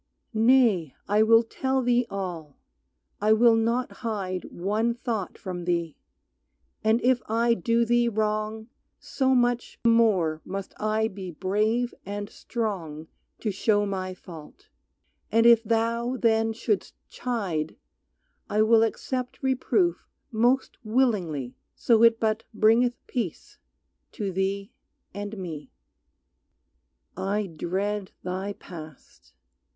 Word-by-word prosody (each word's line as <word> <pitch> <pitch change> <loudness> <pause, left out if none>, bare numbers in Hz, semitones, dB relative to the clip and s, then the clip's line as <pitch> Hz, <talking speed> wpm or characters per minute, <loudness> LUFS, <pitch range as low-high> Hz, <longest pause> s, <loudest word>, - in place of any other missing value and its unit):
Nay 225 - +3
I 210 +2 +3
will 225 +1 +6
tell 265 +3 -1
thee 245 0 +2
all, 175 -7 -5 0.6
I 215 +1 +5
will 230 +1 +6
not 230 +3 0
hide 195 -5 -3
One 215 +6 -1
thought 225 -5 -3
from 175 -2 -6
thee, 170 -3 -1 0.9
and 220 +2 +3
if 250 0 +3
I 230 +2 +2
do 230 +3 +1
thee 240 +1 +3
wrong 215 0 -2 0.3
So 265 -1 +1
much 245 -1 +1
the 235 - +5
more 190 -9 +3
must 195 0 -6
I 215 +1 +1
be 190 -3 -7
brave 210 +8 0
and 205 +1 -5
strong 170 -10 -4 0.3
To 215 - -1
show 205 +1 +2
my 185 -2 -3
fault. 180 - -13 0.6
And 230 +1 +4
if 235 -1 +7
thou 230 +3 0
then 225 -1 +2
shouldst 220 -2 -2
chide 195 -11 -3 0.7
I 210 +1 +3
will 225 0 +5
accept 250 +4 -2
reproof 265 +7 +1 0.2
most 245 +4 +1
willingly 200 - 0 0.2
So 230 -2 +3
it 230 -1 +6
but 220 0 0
bringeth 230 +3 +4
peace 225 - -5 0.5
to 205 -5 -3
thee 195 +3 -2 0.4
and 205 +2 -6
me. 160 -7 -6 1.5
I 200 +3 -1
dread 190 +4 -3
thy 185 +3 -3
past. 155 -7 -13
215 Hz, 120 wpm, -26 LUFS, 190-235 Hz, 1.5 s, if